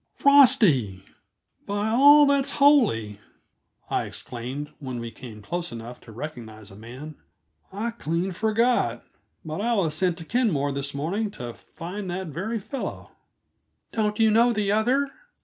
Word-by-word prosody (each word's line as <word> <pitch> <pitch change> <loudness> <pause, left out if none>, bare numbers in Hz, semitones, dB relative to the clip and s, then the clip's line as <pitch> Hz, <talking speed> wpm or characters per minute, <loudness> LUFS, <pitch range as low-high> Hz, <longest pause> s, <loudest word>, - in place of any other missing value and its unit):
"Frosty, 205 - +4 0.6
by 205 +2 -1
all 285 +5 +7
that's 280 -1 +2
holy!" 215 - +3 0.7
I - - -1
exclaimed 130 +5 -7
when 130 -4 -5
we 115 -1 -6
came 110 -4 -11
close 175 +9 -4
enough 115 +1 -8
to 115 - -14
recognize 110 -5 -8
a - - -13
man. 130 +8 -10 0.5
"I 215 +5 -3
clean 175 -3 -2
forgot, 225 +6 +1 0.4
but 160 +5 -4
I 235 +2 +1
was 170 -7 0
sent 175 +1 0
to 165 - -9
Kenmore 170 - 0
this 140 0 -4
morning 190 +10 -2
to 120 -1 -6
find 185 - -8
that 180 0 -4
very 195 +10 -3
fellow." 220 +6 -6 0.8
"Don't 210 -2 -1
you 220 -1 +4
know 235 +3 +4
the 210 -3 0
other?" 245 +7 +2
180 Hz, 145 wpm, -25 LUFS, -, 0.8 s, all